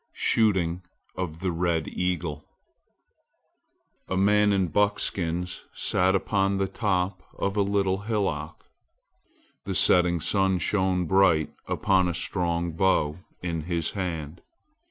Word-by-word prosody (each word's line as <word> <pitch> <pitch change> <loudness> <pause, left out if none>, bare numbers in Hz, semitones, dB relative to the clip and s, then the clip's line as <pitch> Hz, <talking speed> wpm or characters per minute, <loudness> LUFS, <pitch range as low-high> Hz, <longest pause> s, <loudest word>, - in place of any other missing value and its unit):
SHOOTING 95 -6 +1 0.3
OF 85 -3 -5
THE 95 -1 0
RED 85 -2 -1
EAGLE 90 -5 -3 1.6
A 95 - -2
MAN 105 +1 +4
in 95 -3 +1
buckskins 90 -2 -1
sat 95 +1 +2
upon 95 0 0
the 95 0 0
top 95 -2 -1 0.2
of 100 0 -2
a 105 - +2
little 100 -1 +1
hillock. 100 -8 -3 1.0
The - - -3
setting 90 -1 +5
sun 95 +3 +1
shone 95 0 0
bright 85 -4 +3
upon 95 -3 +2
a 85 - -2
strong 85 -1 -1
bow 80 -2 +1 0.2
in 85 -3 -3
his 85 -2 -1
hand. 85 -4 -5
90 Hz, 115 wpm, -26 LUFS, 85-95 Hz, 1.6 s, setting